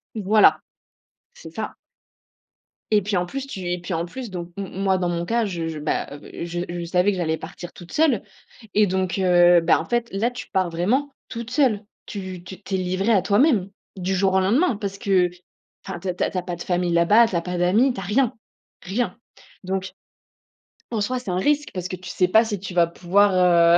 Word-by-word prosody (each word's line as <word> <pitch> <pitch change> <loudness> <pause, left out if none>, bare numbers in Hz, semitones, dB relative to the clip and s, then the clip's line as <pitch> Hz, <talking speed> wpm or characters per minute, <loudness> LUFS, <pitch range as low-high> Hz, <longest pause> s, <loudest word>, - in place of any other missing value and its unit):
Voilà. 215 0 +4 0.8
C'est - - -11
ça - - -4 1.2
et 210 -1 +5
puis, 200 -1 -1
en 180 - 0
plus, 270 +9 -5
tu 190 -10 -5
et 180 - -1
puis, 180 +1 -5
en 165 +1 -1
plus 245 +5 -7
donc 175 -1 -5
m 200 -1 -4
moi, 190 0 0
dans 180 -1 -1
mon 170 0 -2
cas, 230 +3 +1
je 170 -5 -3
je 160 - -4
bah, 150 - -2
je 170 +2 -5
je 175 0 -4
savais 180 +4 +2
que 190 - -3
j'allais 160 -2 0
partir 175 +1 -9
toute 175 - -13
seule 300 -10 +2 0.5
et 210 -1 +4
donc 190 +1 -1
heu, 175 -2 +6
bah, 165 - +3
en - - -4
fait, 240 -1 -1
là, 220 +5 0
tu 240 -4 -8
pars 185 -2 +1
vraiment 235 +13 0 0.2
toute 235 -1 -6
seule! 250 -8 +2 0.3
Tu 185 -3 -6
tu 190 +2 -10
tu 195 - -3
es - - +1
livrée 185 +4 0
à 200 - +4
toi-même, 205 - +3 0.3
du 190 0 -2
jour 190 0 +2
au 190 - +4
lendemain, 235 - +2
parce 200 -2 -4
que 190 -5 +2 0.6
enfin, 190 -3 -5
tu 190 - -7
as - - 0
tu - - -1
as - - 0
tu 185 - -4
as - - +1
pas 175 -1 -5
de 170 - -7
famille 180 -1 0
là-bas, 205 +8 +5
tu 190 - -4
as 170 - +1
pas 180 +1 -4
d'amis, 215 +9 +3
tu 195 - -6
as - - -5
rien, 235 +6 +1 0.5
rien! 225 +7 -2 0.5
Donc 190 0 -3 1.0
en 220 -3 -1
soi, 250 +5 -1
c'est 230 -7 -5
un 180 - -1
risque, 295 +8 +1
parce 180 -1 -3
que 185 - -4
tu 180 0 -10
sais 180 0 +2
pas 220 +5 +5
si 210 -3 -3
tu 190 -1 -7
vas 170 -1 +5
pouvoir, 175 -1 +4
190 Hz, 220 wpm, -23 LUFS, 175-215 Hz, 1.2 s, heu